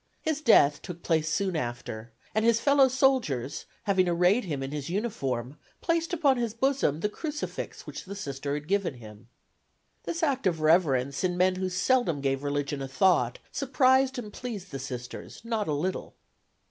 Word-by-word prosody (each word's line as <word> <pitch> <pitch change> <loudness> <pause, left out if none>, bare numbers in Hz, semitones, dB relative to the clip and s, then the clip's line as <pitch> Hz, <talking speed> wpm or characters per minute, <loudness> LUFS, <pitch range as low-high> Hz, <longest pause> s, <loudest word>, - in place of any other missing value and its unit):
His 310 -1 -1
death 145 - +5
took 175 -1 -8
place 160 -2 +1
soon 190 +2 0
after, 120 -4 -4 0.2
and 215 - +1
his 230 0 +4
fellow 280 +1 +5
soldiers, 250 - +1 0.2
having 190 -3 +2
arrayed 180 +7 +3
him 145 -6 -3
in 135 - -5
his 150 0 -4
uniform, 145 - -3 0.2
placed 335 0 0
upon 295 -6 +3
his 235 -2 -2
bosom 255 - +1
the 210 - +2
crucifix 300 +7 -5
which - - -8
the 200 +2 -7
Sister 140 -5 -4
had 150 0 -6
given 195 -6 0
him. 110 -1 -13 0.8
This 335 0 -3
act 270 -8 +1
of 165 -3 0
reverence 140 -5 +2
in 180 -1 0
men 185 +1 +3
who 185 0 -1
seldom 185 - +1
gave 135 -1 0
religion 145 0 -2
a 135 - -3
thought 135 -3 +2
surprised 265 -1 +3
and 215 -4 -6
pleased 205 -7 -6
the 135 - -5
Sisters 125 -2 -7
not 225 -3 -1
a - - 0
little. 180 +6 -3
180 Hz, 170 wpm, -28 LUFS, -, 0.8 s, death